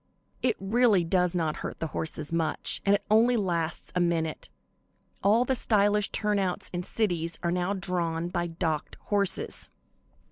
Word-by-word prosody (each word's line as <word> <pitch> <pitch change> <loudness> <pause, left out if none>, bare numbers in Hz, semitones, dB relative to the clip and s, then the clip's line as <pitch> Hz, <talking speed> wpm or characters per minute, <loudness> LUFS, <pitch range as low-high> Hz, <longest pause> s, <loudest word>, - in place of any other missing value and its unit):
It 245 -4 +2
really 210 -1 +3
does 180 +1 +1
not 160 -3 0
hurt - - -5
the - - -2
horses 155 0 -3
much, 165 -2 -1
and 200 - +6
it 205 - -3
only 235 +3 +5
lasts 170 -5 -1
a 180 - 0
minute. 165 -2 -1 0.7
All 220 +5 +4
the 265 - +1
stylish 210 -3 +3
turnouts 200 -4 -1
in 175 - -1
cities 175 -5 -1
are 170 - +1
now 180 +2 0
drawn 175 -3 -2
by 175 -1 -1
docked 165 -2 -3
horses." 200 -2 -1
180 Hz, 150 wpm, -28 LUFS, 165-205 Hz, 0.7 s, and